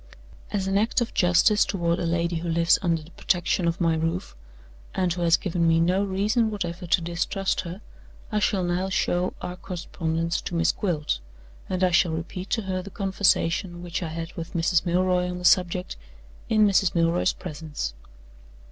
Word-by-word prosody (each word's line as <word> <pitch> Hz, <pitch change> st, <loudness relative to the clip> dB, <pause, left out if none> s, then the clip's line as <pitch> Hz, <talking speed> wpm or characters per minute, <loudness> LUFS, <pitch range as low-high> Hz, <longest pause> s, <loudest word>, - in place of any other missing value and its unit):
As 195 Hz, -2 st, -1 dB
an 195 Hz, +1 st, +2 dB
act 220 Hz, +4 st, +1 dB
of 240 Hz, -, -2 dB
justice 185 Hz, +3 st, +4 dB
toward 170 Hz, -3 st, -1 dB
a 170 Hz, -, -1 dB
lady 170 Hz, 0 st, 0 dB
who 170 Hz, +1 st, -4 dB
lives 170 Hz, +1 st, +3 dB
under 165 Hz, -4 st, 0 dB
the 160 Hz, -, -16 dB
protection 175 Hz, 0 st, 0 dB
of 170 Hz, +2 st, -1 dB
my 165 Hz, -2 st, +2 dB
roof, 165 Hz, +3 st, -2 dB, 0.6 s
and 180 Hz, -2 st, +1 dB
who 175 Hz, -, -5 dB
has 170 Hz, -1 st, +4 dB
given 170 Hz, -3 st, 0 dB
me 165 Hz, 0 st, +4 dB
no 180 Hz, +4 st, +2 dB
reason 210 Hz, +4 st, +1 dB
whatever 180 Hz, -4 st, -4 dB
to 175 Hz, -, +3 dB
distrust 175 Hz, +3 st, -1 dB
her, 180 Hz, +3 st, -8 dB, 0.5 s
I 215 Hz, -, +1 dB
shall 200 Hz, -2 st, +1 dB
now 180 Hz, +2 st, -1 dB
show 180 Hz, -2 st, 0 dB
our 180 Hz, -, -4 dB
correspondence 170 Hz, -3 st, -3 dB
to 175 Hz, -, -5 dB
Miss 165 Hz, 0 st, +3 dB
Gwilt; 155 Hz, -, -1 dB, 0.5 s
and 185 Hz, 0 st, -1 dB
I 180 Hz, -, +4 dB
shall 175 Hz, -1 st, +3 dB
repeat 180 Hz, +4 st, -5 dB
to 225 Hz, -, 0 dB
her 185 Hz, -1 st, -2 dB
the 195 Hz, -, -9 dB
conversation 190 Hz, -2 st, 0 dB
which 175 Hz, 0 st, -3 dB
I 170 Hz, -, -2 dB
had 165 Hz, +1 st, -6 dB
with 165 Hz, 0 st, -7 dB
Mrs. 170 Hz, +1 st, +2 dB
Milroy 180 Hz, +1 st, +2 dB
on 180 Hz, -, -4 dB
the 180 Hz, -, -6 dB
subject, 180 Hz, -, +2 dB, 0.5 s
in 215 Hz, -1 st, +5 dB
Mrs. 195 Hz, -2 st, +2 dB
Milroy's 165 Hz, +1 st, +2 dB
presence. 150 Hz, -, -5 dB
175 Hz, 185 wpm, -25 LUFS, 170-190 Hz, 0.6 s, in